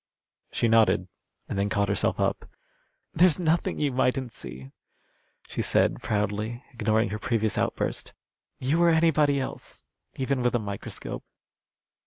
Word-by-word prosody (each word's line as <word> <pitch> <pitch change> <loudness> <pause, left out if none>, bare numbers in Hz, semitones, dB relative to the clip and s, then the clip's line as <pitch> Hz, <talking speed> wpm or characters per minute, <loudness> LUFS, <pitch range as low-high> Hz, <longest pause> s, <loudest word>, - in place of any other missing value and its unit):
She 115 - +1
nodded, 110 -5 +4 0.4
and 100 - -3
then 100 +1 +1
caught 100 +1 +1
herself 100 - 0
up. - - -1 0.6
"There's 170 -1 +5
nothing 170 -1 +1
you 145 -2 +1
mightn't 125 -1 0
see," 65 +2 -9 0.8
she - - -3
said, - - +2
proudly, 105 +4 -2
ignoring 110 -1 +1
her 105 +1 -4
previous 110 -1 0
outburst. - - -1 0.5
"You 150 +7 +1
or 170 - +6
anybody 155 -3 +3
else, 130 - -6 0.3
even 135 0 -1
with 125 0 +1
a - - +3
microscope." 100 -2 -6
120 Hz, 135 wpm, -27 LUFS, 105-140 Hz, 0.8 s, or